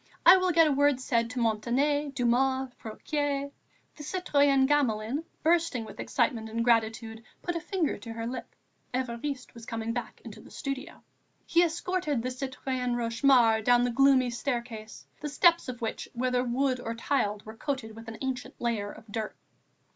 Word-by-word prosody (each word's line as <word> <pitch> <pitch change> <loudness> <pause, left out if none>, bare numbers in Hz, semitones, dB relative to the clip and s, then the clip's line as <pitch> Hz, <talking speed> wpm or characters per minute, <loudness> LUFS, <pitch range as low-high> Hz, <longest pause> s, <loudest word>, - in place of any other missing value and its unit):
I 370 - +11
will 370 -1 +2
get 330 -1 +6
a 305 - +2
word 285 -1 +3
said 235 -2 0
to 250 +1 -4
Montané, 260 +6 +1
Dumas, 260 +1 +1
Fouquier." 280 +4 -2 0.4
The - - -11
citoyenne 285 -5 +2
Gamelin, 265 -1 +1 0.2
bursting 325 -8 +2
with - - -11
excitement 225 -5 0
and 230 +1 -1
gratitude, 225 -1 +1 0.2
put 350 - -2
a - - 0
finger 335 -1 -1
to 230 -2 -7
her 230 0 -4
lip; 250 +2 -6 0.4
Évariste 255 +2 -3
was 230 -2 -12
coming 230 0 -3
back 245 0 -5
into - - -9
the - - -15
studio. 275 +4 -6 0.4
He 335 - +4
escorted 335 -5 -1
the 255 - -2
citoyenne 255 -1 -3
Rochemaure 230 -1 +3
down 245 +1 +5
the 245 - +1
gloomy 265 -1 +4
staircase, 235 -3 -4
the 295 - -4
steps 340 +1 +4
of 245 -2 -6
which, 225 - -3
whether 250 0 0
of 250 - -3
wood 260 +1 +1
or 230 -1 -4
tiled, 220 -4 -1
were 220 +1 -9
coated 235 -3 -4
with 225 0 -11
an 225 0 -7
ancient 260 -1 -4
layer 215 -4 -1
of 220 - -13
dirt. 220 0 -4
250 Hz, 170 wpm, -29 LUFS, 230-285 Hz, 0.4 s, I